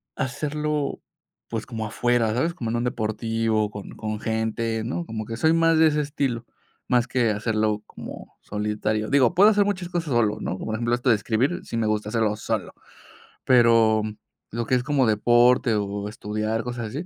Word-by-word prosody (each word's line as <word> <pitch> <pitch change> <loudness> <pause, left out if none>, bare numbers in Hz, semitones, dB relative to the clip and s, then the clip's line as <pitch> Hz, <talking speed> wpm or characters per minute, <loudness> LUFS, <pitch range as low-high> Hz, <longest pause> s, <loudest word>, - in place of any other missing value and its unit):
hacerlo, 150 +2 -2 0.5
pues, 115 -2 -3
como 110 -3 -4
afuera, 115 0 +1
¿sabes? 165 +8 0
Como 115 -9 -4
en - - -1
un 120 - -1
deportivo, 110 -1 -1
con 100 -1 -8
con 110 -1 -4
gente, 110 0 -1
¿no? 135 +9 -2
Como 110 -4 -5
que 115 - -5
soy 160 +4 +3
más 165 0 +4
de 160 - +7
ese 150 0 +1
estilo, 140 -5 -2 0.4
más 125 0 +2
que 120 -3 +1
hacerlo 105 0 0
como - - -10
solitario. 105 +1 -2
Digo, 140 +1 +4
puedo 200 +4 +7
hacer 205 -1 +4
muchas 190 -3 -2
cosas 165 -6 -2
solo, 110 -3 +2
¿no? 95 - -3
Por 110 - -3
ejemplo, 120 +1 -1
esto 125 +1 -1
de 115 - +6
escribir, 125 - 0
sí 115 - -4
me 110 -1 +1
gusta 105 -1 -1
hacerlo 110 -1 +1
solo. - - -3 0.7
Pero 115 -3 +5 0.5
lo 115 +1 -2
que - - -1
es 125 - +1
como 140 -1 +2
deporte, 120 +2 +4
o, 100 0 -2
estudiar, 110 +1 -2
cosas 120 -2 -4
así 145 +10 -5
115 Hz, 185 wpm, -24 LUFS, 110-130 Hz, 0.7 s, de